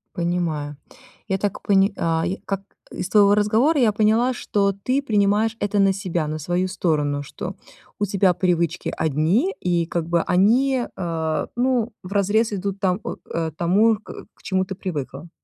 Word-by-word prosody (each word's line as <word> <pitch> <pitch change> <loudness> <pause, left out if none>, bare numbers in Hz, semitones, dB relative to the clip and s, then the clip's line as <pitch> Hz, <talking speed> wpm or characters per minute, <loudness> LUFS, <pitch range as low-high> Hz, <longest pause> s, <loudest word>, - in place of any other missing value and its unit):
Понимаю. 170 -4 -2 0.5
Я 190 -2 0
так 200 0 -3
поня 195 -1 +3
а, 165 -1 0
я 185 +3 -2
как 195 -1 -2 0.3
из 180 - -4
твоего 205 -1 +5
разговора 225 +9 +3
я 235 -4 +4
поняла, 220 +4 +2
что 200 -4 0
ты 255 +8 -1
принимаешь 210 -1 +2
это 205 0 -1
на 195 -1 +4
себя, 180 -5 -2
на 155 +1 -4
свою 175 +4 -1
сторону, 150 -6 0
что 145 - -7 0.4
у 205 - +2
тебя 195 -2 +2
привычки 170 -2 0
одни 160 - +1
и 175 -2 +1
как 165 -1 -3
бы 170 -1 +2
они, 240 +9 +2
э, 160 -3 -2
ну, 245 -2 0
вразрез 205 +4 +1
идут 195 0 -3
там, 185 0 +1 0.3
э, 165 -1 -2
тому, 205 +7 +3
к 215 - -11
к - - -26
чему 190 -1 0
ты 190 - -5
привыкла. 160 -4 -6
195 Hz, 165 wpm, -22 LUFS, 170-210 Hz, 0.5 s, твоего